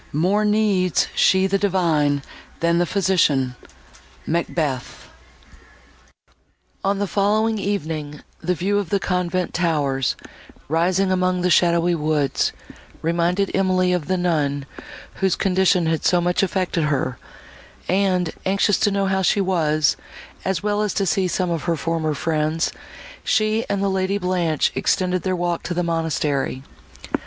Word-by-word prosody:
More 185 +8 +1
needs 210 -4 +2
she 190 0 +4
the 195 +1 +1
divine, 160 -8 +1 0.4
than 170 0 +2
the 175 - +1
physician. 155 -10 +1 0.7
MACBETH 155 -5 -2 1.8
On 195 +1 +1
the 205 - 0
following 210 +3 +1
evening, 155 -7 -3 0.2
the 180 - -1
view 200 +5 0
of 200 -5 -4
the 200 - +1
convent 180 -1 -1
towers, 145 -7 0 0.5
rising 180 +5 +1
among 185 -1 +1
the 180 0 +1
shadowy 170 0 +3
woods, 150 -4 0 0.5
reminded 175 +4 +1
Emily 185 -1 +2
of 175 -4 -2
the 185 0 +1
nun, 150 -6 0 0.5
whose 190 -2 +1
condition 185 -2 +2
had 160 -1 0
so 180 - +3
much 175 +1 +1
affected 185 -4 0
her; 130 -4 -1 0.7
and, 185 -3 +1
anxious 200 +1 +2
to 210 - +3
know 200 -1 0
how 190 0 +1
she 195 +2 +2
was, 155 -6 +1 0.5
as 190 -2 -1
well 210 0 0
as 210 -2 -1
to 195 - +1
see 185 +2 +1
some 180 0 -1
of 165 -3 -3
her 170 -1 +1
former 160 -1 -1
friends, 155 +2 0 0.5
she 215 +1 +1
and 200 -1 0
the - - +2
Lady 190 +1 0
Blanche 180 -5 0
extended 185 -1 0
their 185 +1 -1
walk 175 -1 -1
to 175 - -4
the 175 - 0
monastery. 150 -5 -1
180 Hz, 140 wpm, -21 LUFS, 160-190 Hz, 1.8 s, she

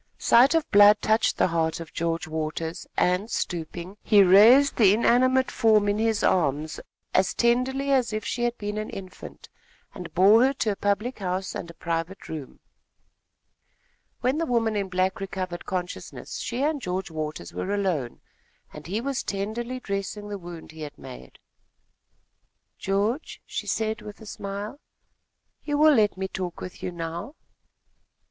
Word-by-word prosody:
Sight 260 +7 +5
of 325 -2 +1
blood 205 +1 +7
touched 220 +1 +2
the - - +3
heart 165 -1 0
of 165 -1 -9
George 165 0 -2
Waters, 160 +1 -4
and, 180 +5 +1
stooping, 175 0 -4
he 205 -2 +5
raised 225 +10 +7
the 205 -3 +6
inanimate 255 +3 +3
form 215 -2 +3
in 205 +1 +1
his 225 -1 +1
arms, 155 -2 +1 0.3
as 190 0 +2
tenderly 260 +4 +1
as 255 -4 +2
if 215 -1 -3
she 240 - -3
had 240 0 0
been 210 0 -4
an 215 - -4
infant, 185 -1 -10 0.5
and 180 -2 -8
bore 205 +6 +6
her 270 +1 +3
to 225 -5 -1
a - - -3
public 205 +6 -1
house 185 0 -3
and 170 - -6
a 170 - -12
private 165 +3 -4
room. 150 -4 -8 1.6
When 260 +5 +1
the 330 - -1
woman 230 -3 +1
in 200 -2 -2
black 185 +1 0
recovered 185 -2 -5
consciousness, 180 -2 -5
she 250 +3 -3
and 295 -1 0
George 185 -2 -3
Waters 155 - -5
were 195 - -3
alone, 180 -12 -1 0.5
and 150 +1 -10
he 205 +6 -2
was 275 +1 -2
tenderly 225 +6 -4
dressing 200 -1 -4
the 205 -1 -5
wound 170 -2 -10
he 160 0 -12
had 145 -1 -7
made. 60 0 -11 1.4
"George," 205 +9 -1
she - - -5
said 220 0 -1
with 210 - -10
a 220 - -12
smile, 205 +5 -6 0.8
"you 290 -1 -1
will 305 +1 +6
let 210 -6 +3
me 190 0 -2
talk 185 -2 -5
with 185 - -8
you 180 - -3
now?" 170 - -6
200 Hz, 160 wpm, -25 LUFS, 175-230 Hz, 1.6 s, blood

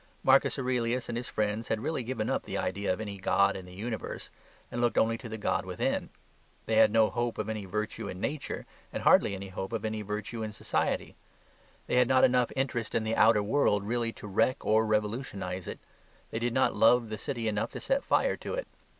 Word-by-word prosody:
Marcus - - +4
Aurelius 125 -2 -1
and 120 - -2
his 120 +1 -4
friends 105 +1 -1
had 110 - 0
really 150 +3 -2
given 120 -2 -3
up - - 0
the - - -5
idea 100 +2 -1
of 95 - -1
any 100 -3 -5
god 100 +1 +3
in 95 -1 -7
the - - -12
universe 110 +3 -5 0.4
and 120 - -2
looked 120 -1 +1
only 115 +1 +3
to 120 - -8
the 110 - -5
god 105 - 0
within. - - -2 0.6
They - - +1
had - - +7
no 110 -1 +4
hope 120 -1 -1
of 110 0 -3
any 110 -2 -3
virtue 105 +3 -3
in 90 - -6
nature, 145 +7 -3 0.3
and - - -4
hardly 100 - +5
any 95 0 -7
hope 95 +2 -5
of 115 -2 -3
any 110 0 -2
virtue 105 +2 -4
in 110 -1 -4
society. - - -1 0.7
They - - 0
had 125 -1 +5
not 130 0 +4
enough 125 -1 +4
interest 125 -4 -2
in 115 - +2
the 110 +1 -1
outer 110 -1 +5
world 105 -3 +2
really 115 +1 -1
to - - -11
wreck 115 +7 +1
or 110 +1 +3
revolutionise 105 -4 -2
it. - - -5 0.5
They 110 - -2
did 120 0 -1
not 130 - +3
love 120 0 +4
the 110 - -4
city 120 -5 -3
enough 105 0 0
to - - -5
set 270 +1 0
fire - - +2
to - - -5
it. - - -4
110 Hz, 220 wpm, -29 LUFS, 105-120 Hz, 0.7 s, had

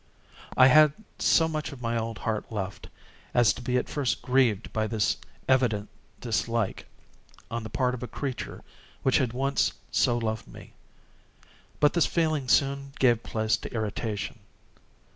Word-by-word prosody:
I 130 - +8
had 150 +2 +7 0.3
so 160 - +4
much 155 -1 -3
of 140 - -10
my 115 -1 -2
old 115 -1 -2
heart 110 +3 -3
left, 100 -3 -5 0.5
as 120 -2 +5
to - - -9
be 125 +1 0
at 125 - -1
first 140 -4 -1
grieved 125 -6 +2
by 110 0 0
this 110 -2 0 0.3
evident 120 -6 +2 0.3
dislike 115 -2 -1 0.6
on 115 +1 -2
the 110 - -7
part 125 +3 0
of 125 - -5
a 125 - -4
creature 135 -1 -5 0.4
which 130 - +4
had 130 -4 0
once 135 +3 +1 0.2
so 120 -2 +2
loved 110 -2 -3
me. - - -13 1.1
But 145 -1 +4
this 170 - +3
feeling 155 -5 0
soon 140 +1 +2
gave 120 -3 +3
place 110 -1 0
to - - -8
irritation. 110 0 -3
125 Hz, 155 wpm, -27 LUFS, 110-135 Hz, 1.1 s, I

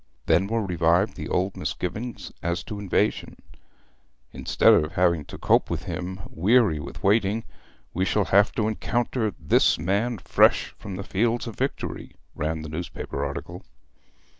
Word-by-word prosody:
Then 85 +4 +3
were 115 0 -1
revived 90 +2 +2
the - - -6
old 95 +2 0
misgivings 110 +7 -4
as 85 +1 -2
to 105 - -7
invasion. 100 -3 0 1.0
'Instead - - +3
of 75 +2 +2
having 85 -4 +2
to - - -9
cope - - +2
with - - -3
him 95 +2 -5
weary 100 -2 +3
with - - -9
waiting, 105 +2 +2 0.5
we 90 - 0
shall 100 +1 +1
have 100 +2 +4
to 110 - 0
encounter 115 0 -1
This 75 - +3
Man 100 +9 0
fresh - - +3
from 95 - -7
the 100 - -5
fields 115 +5 0
of 115 -3 -7
victory,' 135 +2 -4 0.2
ran 80 +1 -3
the 80 - -7
newspaper 80 +2 -5
article. - - -5
95 Hz, 150 wpm, -25 LUFS, 85-110 Hz, 1.0 s, have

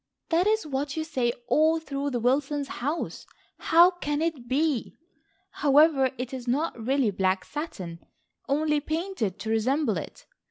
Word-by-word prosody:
That 345 +3 +3
is 435 -4 +2
what 285 +1 -3
you 315 - 0
say 255 -7 0 0.2
all 315 +4 +3
through 280 -2 -3
the 245 -3 -2
Wilsons' 275 +4 0
house. 295 +6 -3 0.4
How 340 +2 +6
can 295 -5 -3
it 310 -7 -2
be! 280 -1 0 0.5
However 285 -1 +4
it 250 +1 -5
is 255 -2 -6
not 295 +7 0
really 260 -2 +2
black 185 -1 0
satin, 190 - -6 0.5
only 300 +1 +2
painted 310 - -3
to 220 - -3
resemble 260 +7 +1
it. - - -8
285 Hz, 150 wpm, -26 LUFS, 250-315 Hz, 0.5 s, How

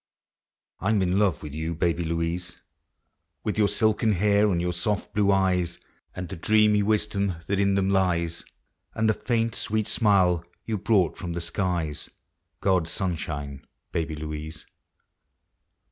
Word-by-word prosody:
I 95 - -1
'm 105 -3 +3
in 90 +2 +1
love 100 -7 +1
with 75 -2 -7
you, 80 +2 -3
Baby 85 0 0
Louise! 85 +2 -2 0.9
With 105 - -2
vour 105 -1 +4
silken 110 +1 +2
hair, 105 +2 +3
and 85 - +1
vour 90 0 -1
soft 100 +4 -2
blue 100 -1 +3 0.2
eves, 90 -2 0 0.4
And 90 -1 -5
the 95 - -6
dreamy 105 +3 +4
wisdom 100 -2 +1
that 100 0 0
in 100 0 +3
them 95 -1 +2
lies. 85 -3 +1 0.5
And 110 0 +1
the 110 - +4
faint, 115 -1 -1
sweet 110 0 -1
smile 95 -7 +3 0.2
you 110 -3 -2
brought 100 -4 +2
from 85 -2 -4
the 85 - -3
skies, 85 -3 -2 0.3
— - - -52
God's 90 -4 +2
sunshine, 75 -7 -3 0.3
Baby 80 -2 -2
Louise. 75 0 -6
95 Hz, 150 wpm, -26 LUFS, 85-105 Hz, 0.9 s, vour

